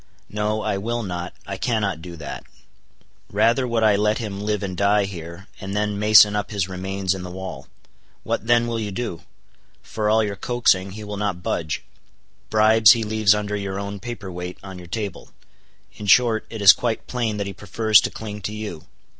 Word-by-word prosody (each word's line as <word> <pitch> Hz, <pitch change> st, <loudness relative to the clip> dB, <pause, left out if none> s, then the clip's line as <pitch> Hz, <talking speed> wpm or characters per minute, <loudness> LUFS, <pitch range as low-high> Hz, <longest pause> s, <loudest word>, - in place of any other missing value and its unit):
No, 105 Hz, +1 st, -1 dB
I 105 Hz, -2 st, -1 dB
will 120 Hz, +3 st, -2 dB
not, 90 Hz, -2 st, -4 dB
I 100 Hz, -1 st, -5 dB
cannot 100 Hz, -7 st, -1 dB
do 85 Hz, 0 st, -8 dB
that. 75 Hz, -4 st, -7 dB, 0.9 s
Rather 115 Hz, +5 st, +2 dB
would 115 Hz, -2 st, 0 dB
I 105 Hz, -2 st, +5 dB
let 105 Hz, +1 st, +1 dB
him 100 Hz, -4 st, -5 dB
live 105 Hz, -1 st, -1 dB
and 95 Hz, -2 st, -4 dB
die 100 Hz, +2 st, +3 dB
here, 85 Hz, 0 st, -8 dB
and 95 Hz, +1 st, -5 dB
then 105 Hz, -1 st, -1 dB
mason 105 Hz, 0 st, +7 dB
up 105 Hz, -, -2 dB
his 100 Hz, -4 st, -1 dB
remains 95 Hz, 0 st, -2 dB
in 95 Hz, -, -6 dB
the 90 Hz, -, -7 dB
wall. 95 Hz, +1 st, -7 dB, 0.6 s
What 115 Hz, -, -3 dB
then 120 Hz, 0 st, +4 dB
will 115 Hz, -1 st, -2 dB
you 105 Hz, -2 st, -3 dB
do? 100 Hz, -4 st, -4 dB, 0.6 s
For 105 Hz, -1 st, -2 dB
all 110 Hz, +1 st, +4 dB
your 100 Hz, -1 st, -3 dB
coaxing, 100 Hz, -4 st, +1 dB
he 110 Hz, +1 st, -8 dB
will 105 Hz, -1 st, -6 dB
not 100 Hz, -4 st, -2 dB
budge. 80 Hz, -5 st, -2 dB, 0.7 s
Bribes 110 Hz, 0 st, +6 dB
he 115 Hz, -2 st, -2 dB
leaves 110 Hz, -1 st, +3 dB
under 105 Hz, 0 st, -2 dB
your 100 Hz, -1 st, -3 dB
own 100 Hz, 0 st, -5 dB
paperweight 90 Hz, -5 st, -6 dB
on 95 Hz, -2 st, -9 dB
your 90 Hz, -, -11 dB
table; 100 Hz, -1 st, -5 dB, 0.6 s
in 105 Hz, -, -8 dB
short, 115 Hz, +1 st, +4 dB
it 110 Hz, -3 st, -6 dB
is 100 Hz, -, +11 dB
quite 115 Hz, -2 st, -2 dB
plain 115 Hz, -4 st, -2 dB
that 100 Hz, -, -2 dB
he 100 Hz, -, -5 dB
prefers 105 Hz, +3 st, +3 dB
to -, -, -2 dB
cling 105 Hz, -1 st, -7 dB
to 105 Hz, -, -4 dB
you. 105 Hz, -7 st, -7 dB
105 Hz, 195 wpm, -22 LUFS, 95-110 Hz, 0.9 s, is